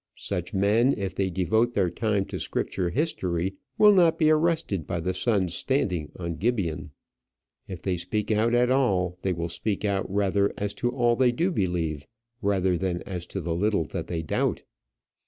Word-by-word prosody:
Such 90 -3 -3
men, 105 +7 +3
if 95 -4 -3
they 95 0 0
devote 110 +7 +1
their 95 -4 +2
time 105 -4 0
to - - -6
Scripture 90 -2 -2
history, 95 - -1 0.2
will 210 -1 +7
not 175 -4 +4
be 155 -1 +4
arrested 155 - +1
by 85 - -2
the 90 +3 -1
sun's 95 -2 0
standing 90 - -1
on 85 -2 -4
Gibeon. 100 -8 -1 0.8
If 90 -4 -8
they 95 -2 0
speak 105 +5 -2
out 110 +3 +2
at 125 +1 +3
all, 95 -10 +2
they 95 - 0
will 85 -1 -2
speak 100 +4 -2
out 100 -2 -1
rather 100 0 +2
as 100 0 -2
to 120 - +2
all 120 -1 +2
they 125 0 +3
do 170 +10 0
believe 85 - -1 0.3
than 95 -3 0
as 90 -3 -6
to 95 - -4
the 85 0 -2
little 100 +1 +1
that 85 -3 -4
they 80 -2 -3
doubt. 80 - -1
95 Hz, 175 wpm, -26 LUFS, 90-120 Hz, 0.8 s, will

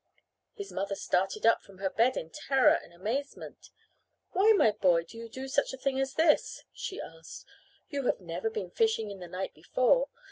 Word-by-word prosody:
His 405 -3 -7
mother 195 +1 -2
started 195 +3 0
up 230 - +5
from 195 - -17
her 190 0 -2
bed 235 +6 +2
in 160 - -5
terror 270 -3 +3
and - - -4
amazement. 225 +11 -5 0.6
"Why, 400 +4 +5
my 225 - +5
boy, 185 -5 +3
do 170 - -15
you 230 0 -8
do 260 +3 -7
such 275 +1 0
a - - -6
thing 265 0 -1
as 270 0 -1
this?" 320 -1 +2
she 385 - -6
asked. 165 0 -10 0.4
"You 280 -3 -2
have - - +1
never 175 - -3
been 440 0 -5
fishing 445 - +1
in 195 - -9
the 180 - -8
night 185 +2 -5
before. 255 - +2
230 Hz, 190 wpm, -30 LUFS, 190-280 Hz, 0.6 s, up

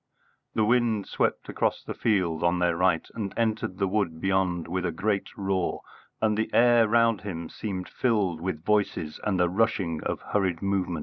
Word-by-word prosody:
The 110 - +3
wind 115 -3 +2
swept - - -1
across - - -1
the - - -5
field 90 -7 0
on 85 +1 +3
their 90 -1 +2
right 90 -1 +2
and 105 -4 -4
entered 110 -5 -1
the 95 - +1
wood 95 -5 -1
beyond 95 -2 0
with 90 +2 -2
a 90 - 0
great 100 +4 -1
roar, 95 -2 -1 0.4
and 110 -1 +2
the 110 +1 -1
air 120 -1 +6
round 115 -1 +3
him 85 -5 -5
seemed 95 -4 -5
filled 100 -9 0
with 85 -3 -4
voices 100 -7 0
and 100 -3 0
the 90 - +4
rushing 95 -4 0
of - - -2
hurried 95 -5 0
movement. 95 -4 0
95 Hz, 180 wpm, -27 LUFS, 90-110 Hz, 0.4 s, air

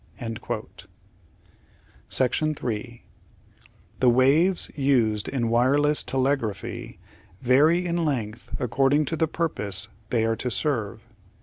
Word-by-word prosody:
3 125 -4 -1 1.0
The 125 - +4
waves 145 +9 +4
used 120 -7 +1
in 125 -4 -1
wireless 140 +6 +3
telegraphy 130 -6 -2 0.4
vary 150 +8 +3
in 170 -1 -1
length 120 -7 -4
accord 135 +3 +1
ing 150 0 +2
to 165 - -2
the 160 0 +1
purpose 105 - -2 0.2
they 115 -2 +1
are 115 0 +1
to 125 - -3
serve. 115 -5 -2
130 Hz, 100 wpm, -25 LUFS, 115-150 Hz, 1.0 s, The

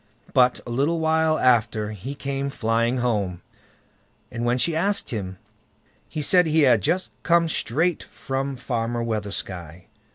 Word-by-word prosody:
But 125 -1 +4
a 120 - -6
little 145 +7 +1
while 160 0 +2
after 115 -3 +2
he 110 +7 -7
came 140 0 -3
flying 115 0 0
home, 100 -8 -1 0.9
and 120 -1 -4
when 120 +1 +2
she 165 +5 +1
asked 200 +5 0
him, 95 -5 -4 0.7
he 155 - -3
said 180 +3 +4
he 160 0 +3
had 125 -6 +5
just 180 - 0
come 170 -1 +3
straight 160 +3 0
from 135 +1 -4
Farmer 120 -2 -2
Weathersky. 95 -6 -5
125 Hz, 140 wpm, -24 LUFS, 110-155 Hz, 0.9 s, had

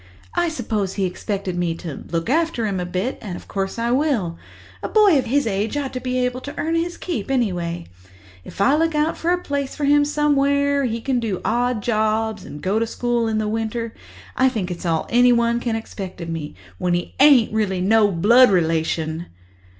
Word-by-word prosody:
I 345 -1 +1
suppose 210 - -2
he 195 - 0
expected 190 0 -3
me 175 -2 -1
to 165 -3 -8
look 165 -1 -1
after 315 -4 +1
him 195 -3 -1
a 180 - -3
bit—and 190 +1 -3
of - - -10
course 195 +1 -3
I 235 +1 0
will. 250 - +1 0.5
A - - -4
boy 410 -9 +5
of - - -2
his 280 +4 +1
age 215 +5 -1
ought 280 -2 -3
to 255 - -3
be 255 0 -2
able 250 +1 -3
to 285 - -8
earn 325 +1 -1
his 340 +1 -1
keep, 300 - -4
anyway. 175 -10 -1 0.6
If - - -7
I 275 +8 +5
look 325 0 +1
out 300 +2 0
a 350 +2 +2
place 280 -5 -3
for 295 - -2
him 290 +1 +5
somewhere 285 -1 +2
where 275 - +1
he 230 -1 -2
can 260 0 0
do 215 -6 -2
odd 245 -2 0
jobs 220 -1 0
and 145 - -9
go 200 +4 +1
to 230 - 0
school 240 0 -1
in 220 -1 0
the 215 -1 -1
winter, 225 +1 -3 0.4
I 260 0 +4
think 205 -8 -3
it's 175 0 -5
all 160 -1 0
anyone 235 -1 +4
can 235 -2 -2
expect 195 -5 -7
of 170 -1 -6
me, 160 - -5 0.2
when 175 -1 +1
he 175 - -4
ain't 270 -6 +6
really 205 -4 0
no 210 +3 +4
blood 235 +9 +6
relation." 160 -2 0
225 Hz, 205 wpm, -21 LUFS, 190-275 Hz, 0.6 s, ain't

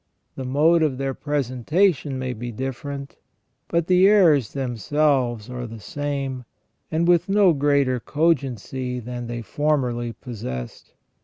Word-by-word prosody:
The 130 - -5
mode 155 +6 +3
of 150 -5 +1
their 135 0 -2
presentation 145 - 0
may 130 -1 -3
be 120 +1 -6
different, 135 +3 -5 0.5
but 170 -1 0
the 185 +2 +5
errors 165 - +4
themselves 130 -2 0
are 125 -1 -5
the 115 0 -9
same, 140 +1 -4 0.5
and 165 +1 0
with 175 +1 +3
no 195 -3 +5
greater 140 -3 +2
cogency 130 -4 -1
than 120 0 -6
they 120 0 -5
formerly 125 -2 -1
possessed. 65 - -7
135 Hz, 130 wpm, -23 LUFS, 125-150 Hz, 0.5 s, the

